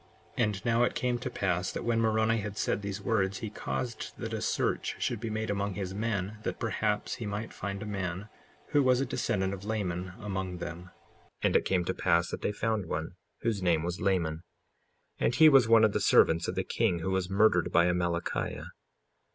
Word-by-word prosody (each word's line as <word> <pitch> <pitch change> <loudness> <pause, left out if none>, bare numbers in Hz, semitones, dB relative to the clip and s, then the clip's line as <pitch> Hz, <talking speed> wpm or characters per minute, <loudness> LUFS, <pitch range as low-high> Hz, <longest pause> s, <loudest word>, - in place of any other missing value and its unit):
55:4 - - +2
And 105 -2 -4
now 115 0 +3
it 125 - +2
came 125 -1 0
to - - -4
pass 90 -2 -1
that - - -5
when 115 -1 +1
Moroni 110 0 +2
had 105 0 -5
said - - 0
these 100 -1 -5
words, 100 -4 +1
he 110 -3 -5
caused 115 +2 -4
that - - -5
a - - -2
search - - 0
should 120 - -1
be 115 0 -4
made 110 0 -2
among 100 -1 -2
his 95 -2 -4
men, 105 -1 -2
that - - -3
perhaps 105 -2 -1
he 115 - -5
might 105 +2 -4
find 100 +1 -4
a - - -6
man 100 -1 -4 0.4
who 145 - +4
was 130 -2 +4
a 135 - +1
descendant 95 -5 -1
of 100 0 -7
Laman 95 -4 -3
among 95 -3 -4
them. 85 0 -6
55:5 90 - -17 0.5
And - - +2
it - - +4
came 90 -2 +1
to - - -1
pass 85 +1 +1
that - - -5
they - - 0
found 105 -2 -1
one, 80 0 -3 0.3
whose 115 -4 -1
name 85 -3 +2
was 85 +1 -3
Laman; 85 -4 0 0.8
and 120 - +1
he 160 - +8
was 135 -6 +6
one 115 -1 +6
of 110 -2 +4
the - - +1
servants 85 +1 +4
of - - -3
the - - 0
king 110 -7 +1
who 95 - -2
was 95 -1 0
murdered 95 -3 +3
by 85 - +5
Amalickiah. 85 -1 -1
100 Hz, 215 wpm, -30 LUFS, 90-110 Hz, 0.8 s, he